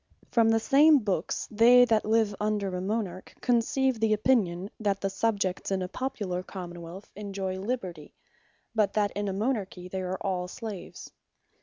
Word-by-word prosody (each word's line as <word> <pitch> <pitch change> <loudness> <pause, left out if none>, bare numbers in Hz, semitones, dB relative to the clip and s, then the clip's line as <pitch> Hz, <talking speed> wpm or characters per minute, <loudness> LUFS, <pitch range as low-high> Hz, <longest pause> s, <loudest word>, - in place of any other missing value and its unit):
From 230 -2 +4
the 225 0 +4
same 295 +6 +6
books, 195 - -2
they 240 +3 +7
that 225 -3 +2
live 220 -1 +2
under 210 -3 -1
a 180 - -3
Monarch 190 -2 -3
conceive 245 0 +1
an 220 -1 +3
opinion, 205 -5 +1
that 200 -2 0
the 195 0 -2
Subjects 200 -2 -1
in 190 -1 0
a - - -3
Popular 195 -5 -3
Common 175 -2 -8
wealth 175 +4 -10
enjoy 195 -2 -4
Liberty; 190 -8 -5 0.6
but 215 -3 +2
that 205 -1 +1
in 205 0 -3
a 195 - -1
Monarchy 200 -4 -2
they 190 0 -3
are 185 0 -3
all 185 -3 -2
Slaves. 205 -2 -8
205 Hz, 165 wpm, -28 LUFS, 185-225 Hz, 0.6 s, they